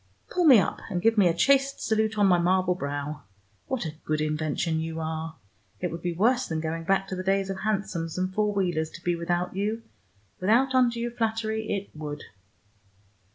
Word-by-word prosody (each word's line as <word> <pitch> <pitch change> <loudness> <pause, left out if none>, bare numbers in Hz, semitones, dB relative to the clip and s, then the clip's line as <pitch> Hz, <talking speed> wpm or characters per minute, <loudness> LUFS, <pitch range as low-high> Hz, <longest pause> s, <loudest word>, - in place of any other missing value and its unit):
Pull 355 -1 +1
me 270 -6 +9
up, 190 - +1
and 180 -3 -1
give 225 +5 +3
me 200 -4 +5
a 170 - +3
chaste 275 +7 +3
salute 220 0 0
on 205 - +4
my 180 -2 +5
marble 180 +1 +2
brow. 145 -2 -4 0.5
What 260 -8 -2
a 155 - -4
good 155 0 -1
invention 155 +2 -1
you 160 0 -4
are! 160 0 -4 0.4
It 180 - -2
would 165 0 -6
be 175 - -1
worse 235 +9 +2
than 160 -1 -2
going 165 +1 -3
back 195 +1 +1
to 185 - -3
the 185 - -3
days 195 +1 0
of 190 - -5
hansoms 190 -6 -2
and 185 +1 -1
four 210 +1 +1
wheelers 175 -6 0
to 170 - -12
be 175 -1 +1
without 175 +2 -2
you. 215 +3 -2 0.6
Without 235 +8 +3
undue 240 -2 +2
flattery, 220 -1 -2
it 200 -1 -3
would!" 150 -1 -6
185 Hz, 195 wpm, -27 LUFS, 165-220 Hz, 0.6 s, me